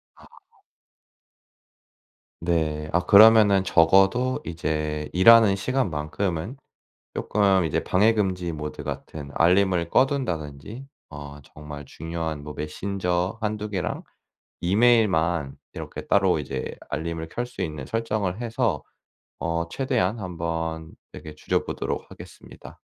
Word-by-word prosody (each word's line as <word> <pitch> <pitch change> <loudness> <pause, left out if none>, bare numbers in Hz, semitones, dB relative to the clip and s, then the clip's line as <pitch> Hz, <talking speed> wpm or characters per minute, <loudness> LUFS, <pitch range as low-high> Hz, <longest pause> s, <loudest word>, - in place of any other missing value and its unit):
아. - - -18 2.1
네. 80 -3 -1
아 90 - +4
그러면은 105 0 +7
적어도 95 +9 +3
이제 75 -2 -3
일하는 110 +2 +7
시간만큼은 95 - -2 0.6
쪼끔 100 -3 +2
이제 80 - 0
방해금지 95 -3 +1
모드 75 -1 -6
같은 75 -2 -7
알림을 90 -1 +3
꺼 130 - +5
둔다든지 105 - -5 0.3
어 70 0 -9
정말 75 0 -10
중요한 80 0 -5
뭐 75 0 -7
메신저 90 +4 -2
1-2 105 -1 -3
개랑 95 -4 -3 0.6
이메일만 90 - +2 0.2
이렇게 - - -7
따로 95 -4 +3
이제 65 -3 -5
알림을 80 +1 -4
켤 120 - -3
수 125 -4 -11
있는 75 -6 -4
설정을 110 - -2
해서 115 -2 -1 0.6
어 85 0 -2
최대한 120 -2 -1
한번 80 -3 -4 0.2
이렇게 75 -1 -10
줄여보도록 - - -3
하겠습니다. - - -13
90 Hz, 245 characters per minute, -24 LUFS, 80-105 Hz, 2.1 s, 그러면은